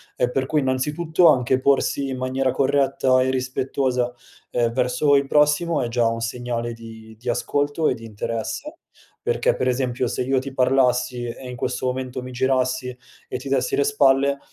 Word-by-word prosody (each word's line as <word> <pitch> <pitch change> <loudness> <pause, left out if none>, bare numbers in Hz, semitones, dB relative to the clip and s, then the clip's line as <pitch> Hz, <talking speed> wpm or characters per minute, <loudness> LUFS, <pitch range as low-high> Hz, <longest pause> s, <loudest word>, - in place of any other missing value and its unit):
e 125 0 0
per 130 0 -1
cui 150 0 +1
innanzitutto 150 +6 +2
anche 130 -1 +3
porsi 140 +1 +1
in 130 - -3
maniera 130 +1 0
corretta 135 -1 +2
e 130 - +1
rispettosa 130 -1 -1 0.4
e 120 -1 0
verso 125 +4 +2
il 140 0 +2
prossimo, 150 +3 +2
è 120 - -3
già 120 -1 +2
un 115 0 -2
segnale 120 0 -3
di 110 -1 -12
di 120 +1 -5
ascolto 145 +5 0
e - - +2
di 115 - -10
interesse; 115 - -5 0.4
perché 475 +1 +1
per - - -1
esempio, 125 0 0
se 125 - -2
io 135 +1 +1
ti 135 +1 -7
parlassi 125 -1 +2
e 125 +2 -7
in 125 - -6
questo 125 +2 -3
momento 130 0 -3
mi 130 - -8
girassi 130 0 0 0.3
e - - -4
ti 135 - -9
dessi 130 -2 +1
le 140 - +2
spalle, 140 -1 +3
130 Hz, 180 wpm, -22 LUFS, 125-140 Hz, 0.4 s, anche